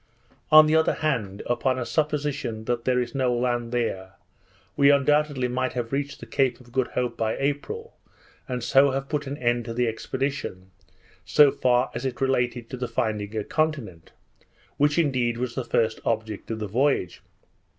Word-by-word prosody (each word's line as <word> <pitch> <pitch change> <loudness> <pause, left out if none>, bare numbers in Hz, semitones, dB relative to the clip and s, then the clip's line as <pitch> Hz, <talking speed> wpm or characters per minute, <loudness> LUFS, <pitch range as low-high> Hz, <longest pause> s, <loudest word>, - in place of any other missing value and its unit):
On 155 0 +10
the 155 +1 +2
other 160 0 +3
hand, 100 -9 -1
upon 125 +2 0
a 125 - -2
supposition 145 -4 -2
that 120 0 -2
there 125 -1 +2
is 120 -1 -3
no 130 -2 +1
land 120 -1 -1
there, 95 -6 -2 0.6
we 140 0 +5
undoubtedly 145 -1 +3
might 130 +1 -2
have 120 -2 -3
reached 140 +1 -3
the - - -9
Cape 130 -3 0
of 120 -1 -17
Good 130 0 0
Hope 125 -1 -1
by 110 -1 -1
April, 145 - -3 0.5
and 125 -3 -3
so 135 +3 +5
have 135 +1 -3
put 150 -2 -2
an 140 +2 -4
end 120 -2 0
to 115 - -5
the 125 0 +1
expedition, 115 -5 -4 0.5
so 145 -2 +5
far 125 -3 +1
as 120 - -5
it 125 -2 -3
related 125 -3 0
to 130 - -4
the 125 0 -3
finding 110 -3 -2
a 105 - -1
continent; 135 - -2 0.7
which 150 +2 +2
indeed 130 -7 +1
was 125 -1 -3
the 130 - -3
first 115 -1 0
object 110 -2 -3
of 115 - -2
the 105 -1 -4
voyage. 120 -4 0
125 Hz, 180 wpm, -25 LUFS, 115-140 Hz, 0.7 s, On